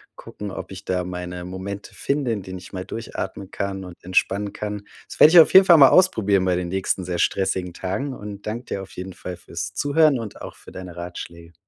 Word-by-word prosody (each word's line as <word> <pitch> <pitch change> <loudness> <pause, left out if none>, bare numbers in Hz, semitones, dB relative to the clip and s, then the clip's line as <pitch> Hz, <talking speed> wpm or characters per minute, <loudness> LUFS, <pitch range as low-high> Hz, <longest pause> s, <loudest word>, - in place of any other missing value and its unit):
gucken, 105 -1 -8
ob - - -7
ich 95 - -9
da 90 -1 -1
meine 90 0 -6
Momente 95 +3 -7
finde, 140 -4 -1
in 105 -4 -3
denen 95 0 -7
ich 90 - -13
mal 95 -1 -5
durchatmen 100 -3 -6
kann 95 -1 -3
und 90 -2 -11
entspannen 100 +2 +1
kann. 105 -1 -5 0.3
Das - - -10
werde 155 - +9
ich 175 - +10
auf - - +2
jeden 190 0 +9
Fall 170 -3 +8
mal 135 -3 +9
ausprobieren 105 - +4
bei 90 - +2
den 90 -1 -2
nächsten 95 0 -1
sehr 90 -1 -3
stressigen 95 -2 0
Tagen 105 +11 -3
und 105 -3 -8
danke 115 +3 -3
dir 100 - -4
auf 95 - -11
jeden 95 +1 -6
Fall 90 0 -7
fürs 85 -1 -6
Zuhören 145 -2 +3
und 110 -3 -8
auch - - -8
für - - -15
deine 90 -2 -9
Ratschläge. 85 -1 -8
95 Hz, 220 wpm, -23 LUFS, 90-105 Hz, 0.3 s, ich